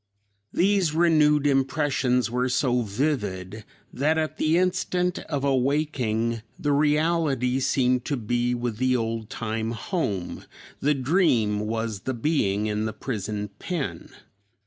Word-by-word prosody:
These 185 -4 +2
renewed 150 -3 +4
impressions 135 -3 +1
were 125 +1 0
so 125 -1 +1
vivid 105 -4 -2 0.3
that 150 +5 +1
at 155 -1 -2
the 155 +2 +2
instant 180 0 0
of 145 -3 -2
awaking 130 -5 0 0.2
the 145 - -1
reality 150 -3 +2
seemed 125 -2 +1
to 145 - -1
be 120 +2 0
with 120 -2 -3
the 130 +1 +2
old 115 -1 -3
time 110 0 -3
home; 110 - -3 0.3
the 145 +1 +2
dream 130 - +2
was 110 0 -2
the 130 +6 -3
being 110 -7 0
in 105 0 -1
the 110 - -3
prison 105 -3 -4
pen. 135 - -4
125 Hz, 125 wpm, -25 LUFS, 110-150 Hz, 0.3 s, renewed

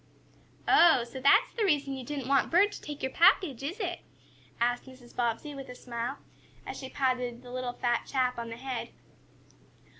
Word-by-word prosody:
"Oh, 325 -8 +6
so 245 +2 -8
that's 395 - +5
the 455 - -1
reason 290 -7 +1
you 265 -1 -5
didn't 275 -1 -5
want 275 0 +3
Bert 390 +5 +4
to - - -9
take 295 -1 -7
your 265 - -1
package, 325 - +4
is 315 +10 -4
it?" 355 -4 -2 0.6
asked 245 +1 +1
Mrs. 255 -2 -15
Bobbsey, 240 +5 -1
with 275 -2 -8
a 250 - -8
smile, 235 -1 -4 0.5
as - - -6
she 265 - -7
patted 250 -3 -1
the 245 - -11
little 250 -1 -3
fat 240 -1 -1
chap 250 -2 0
on 230 0 -5
the 230 - -7
head. 260 0 -4
260 Hz, 185 wpm, -29 LUFS, 245-295 Hz, 0.6 s, Oh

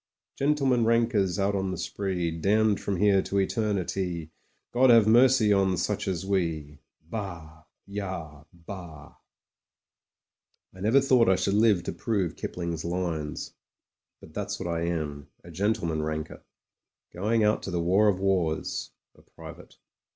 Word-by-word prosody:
4t - - -44
Gentlemen 135 -4 +2
rankers 115 -5 +2
out 100 0 +1
on 95 -1 -1
the 95 - -4
spree, 90 -4 -2
Damned 105 +6 +2
from 100 -2 -2
here 100 0 +4
to 100 - -3
eternity: 95 -5 -1 0.4
God 130 +2 +4
have 115 -3 +7
mercy 120 -2 +5
on 95 -2 +2
such 95 +4 -2
as 95 -1 -2
we. 80 -7 -2 0.3
Bah! 85 -6 -7 0.2
Yah! 90 -7 -6
Bah!" 85 -3 -10 1.6
I 95 - -14
never 110 +8 +4
thought 130 -5 +4
I 95 - +5
should 100 - 0
live 105 -4 +3
to - - -3
prove 100 -8 -1
Kipling's 85 -2 -4
lines. 85 -4 -3 0.7
But - - -15
that's - - -4
what - - -4
I 85 0 -1
am 75 -4 -3
— - - -40
a 85 - -12
gentleman 85 -4 -1
ranker; 80 0 -5 0.7
going 110 +5 +1
out 105 +1 +2
to - - -6
the 90 -2 -1
war 95 +5 +3
of 95 -3 +2
wars 90 -5 -1 0.2
— - - -60
b, - - -20
private. - - -12
95 Hz, 150 wpm, -27 LUFS, 85-105 Hz, 1.6 s, have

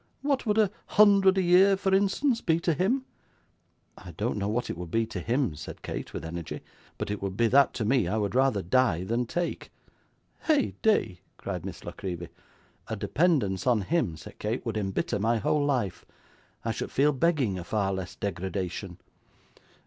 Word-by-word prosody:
What 275 -4 0
would 210 0 +2
a 210 -3 +4 0.2
hundred 200 -2 +5
a 190 - +3
year 190 +3 +5
for 190 0 0
instance, 225 +6 +2
be 165 -1 +2
to 170 - +2
him?' 230 - 0 0.9
'I 90 -3 -10
don't 110 +1 -1
know 100 0 -1
what 115 +4 -1
it - - -5
would 90 0 -7
be 115 +5 +1
to 110 -4 -6
him,' 120 - 0
said 75 +1 -9
Kate, - - -5
with - - -6
energy, 85 0 -6 0.4
'but - - -3
it 105 - -4
would 95 0 -4
be 115 - +3
that 140 +3 +5
to 110 - -2
me 120 -4 +2
I 105 +5 0
would 105 -2 -1
rather 130 -6 +2
die 90 -3 +2
than 115 +5 -1
take.' 175 +6 -3 0.7
'Heyday!' 220 - +1 0.2
cried - - -5
Miss - - -8
La - - -4
Creevy. 90 -3 -6 0.6
'A - - -3
dependence 135 - +1
upon 120 -4 +4
him,' 100 - 0
said - - -12
Kate, - - -2
'would - - -2
embitter 100 0 -1
my 115 +3 +2
whole 145 +7 +1
life. 125 -10 -1 0.6
I - - +1
should - - -4
feel 145 +2 +3
begging 135 - +1
a - - -6
far 100 0 -1
less 95 -2 -5
degradation. 95 -1 -4
120 Hz, 185 wpm, -28 LUFS, -, 0.9 s, hundred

